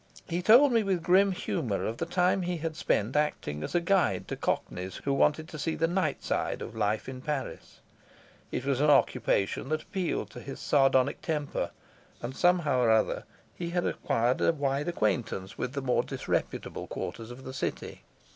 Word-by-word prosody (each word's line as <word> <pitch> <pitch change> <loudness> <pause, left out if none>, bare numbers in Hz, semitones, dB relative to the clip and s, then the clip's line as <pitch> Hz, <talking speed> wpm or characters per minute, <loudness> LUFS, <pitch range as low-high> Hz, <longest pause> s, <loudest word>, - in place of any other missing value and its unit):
He 175 +1 -1
told 245 +9 +7
me 230 - +4
with 190 -5 0
grim 190 +3 +5
humour 115 - -2
of 115 - -3
the - - -3
time 180 +1 +2
he 175 -1 -2
had 160 0 -4
spent 130 -7 0
acting 150 - -1
as - - -4
guide 195 0 +2
to - - -2
Cockneys 90 0 -2
who 140 - +1
wanted 150 +3 +2
to 155 - -8
see 160 +2 -1
the 165 - +1
night 180 +3 -1
side - - -1
of - - -8
life 105 0 0
in 130 -1 -6
Paris; 145 -2 -5 0.7
it 125 - -3
was 140 -1 +1
an 150 - +4
occupation 125 -4 +2
that 155 0 -1
appealed 175 - -2
to 120 - -9
his 135 +2 -8
sardonic 135 -2 +3
temper 150 -4 -2 0.5
and 125 +2 -5
somehow 175 -7 +3
or 120 - +3
other 110 -1 +2 0.3
he 170 -1 -4
had 175 0 0
acquired 120 +3 0
a - - +4
wide 140 0 -1
acquaintance 100 - -1
with 125 +1 -2
the 140 -2 -3
more 125 -2 +2
disreputable - - -3
quarters 115 0 -5
of 125 +2 -10
the 130 - -7
city. 135 - -4
145 Hz, 185 wpm, -29 LUFS, 125-175 Hz, 0.7 s, told